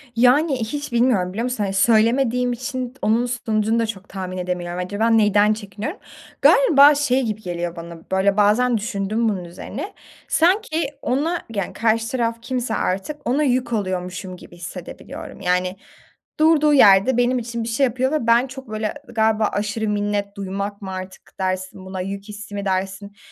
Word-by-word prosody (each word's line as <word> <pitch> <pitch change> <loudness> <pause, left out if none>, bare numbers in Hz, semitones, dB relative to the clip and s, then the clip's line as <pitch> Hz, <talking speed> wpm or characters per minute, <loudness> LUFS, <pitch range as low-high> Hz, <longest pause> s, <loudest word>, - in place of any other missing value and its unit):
Yani, 270 +5 +4
hiç 290 +5 -5
bilmiyorum 235 -7 +2
biliyor 225 +4 -2
musun? 250 -4 -1
Hani, 195 -1 -2
söylemediğim 240 +4 +3
için 255 0 -4
onun 225 +3 +2
sonucunu 225 -2 0
da 230 - +2
çok 205 -3 -7
tahmin 185 -1 -5
edemiyorum. 180 -1 -3
Acaba 205 +5 0
neden 210 -1 +4
çekiniyorum? 215 - -6 0.4
Galiba 295 - +7
şey 270 -2 +1
gibi 215 -2 -3
geliyor 175 -2 -4
bana, 170 0 -8
böyle, 195 +2 +2
bazen 230 +4 +3
düşündüm 215 +1 -1
bunun 190 -4 -3
üzerine, 215 - -7 0.3
sanki 335 -3 +2
ona, 310 +7 -1
yani, 200 -2 -2
karşı 225 0 +1
taraf 230 -2 -1
kimse 240 -2 -2
artık 230 +11 -3
ona 285 +5 +2
yük 255 -2 0
oluyormuşum 185 -2 -3
gibi 175 - -14
hissedebiliyorum. 175 +1 -9
Yani 180 +1 0 0.6
durduğu 305 -2 +5
yerde 205 0 +6
benim 245 +1 +2
için 235 -1 -4
bir 230 - -4
şey 250 +5 +1
yapıyor 260 +3 0
ve 300 -7 -1
ben 235 +3 +4
çok 265 -2 -10
böyle, 215 0 -3
galiba 220 -2 +2
aşırı 215 +2 -2
minnet 205 0 -1
duymak 200 +1 -4
mı 190 - -6
artık 185 0 -9
dersin 185 0 -3
buna 190 0 -5
yük 195 +2 -5
hissi 210 0 -9
mi 200 0 -3
dersin? 195 +1 -3
220 Hz, 160 wpm, -21 LUFS, 195-250 Hz, 0.6 s, Galiba